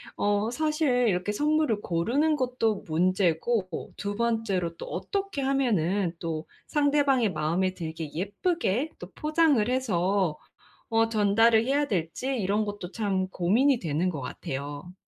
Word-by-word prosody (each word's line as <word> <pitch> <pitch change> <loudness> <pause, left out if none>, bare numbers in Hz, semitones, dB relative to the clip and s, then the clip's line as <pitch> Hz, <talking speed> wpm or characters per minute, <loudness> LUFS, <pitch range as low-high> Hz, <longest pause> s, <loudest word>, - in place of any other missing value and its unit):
어 205 +2 +1
사실 305 +3 0 0.2
이렇게 185 +2 0
선물을 295 -3 +1
고르는 265 - +1
것도 245 -5 0
문제고 185 +3 0
2 205 0 -4
번째로 210 -7 -1
또 - - -7
어떻게 395 -7 -3
하면은 205 -10 +1
또 160 -1 -4 0.2
상대방의 285 -6 +2
마음에 170 +4 0
들게 160 -2 -5
예쁘게 225 - -1
또 175 +2 -10
포장을 305 -7 +2
해서 195 -8 0 0.5
어 225 0 +2
전달을 220 +1 +4
해야 285 +3 +1
될지 180 - -2
이런 205 0 +1
것도 205 -3 -6
참 195 -4 -1
고민이 230 +10 +2
되는 165 +1 0
것 145 - -5
같아요. 145 +6 -6
205 Hz, 270 characters per minute, -27 LUFS, 180-255 Hz, 0.5 s, 전달을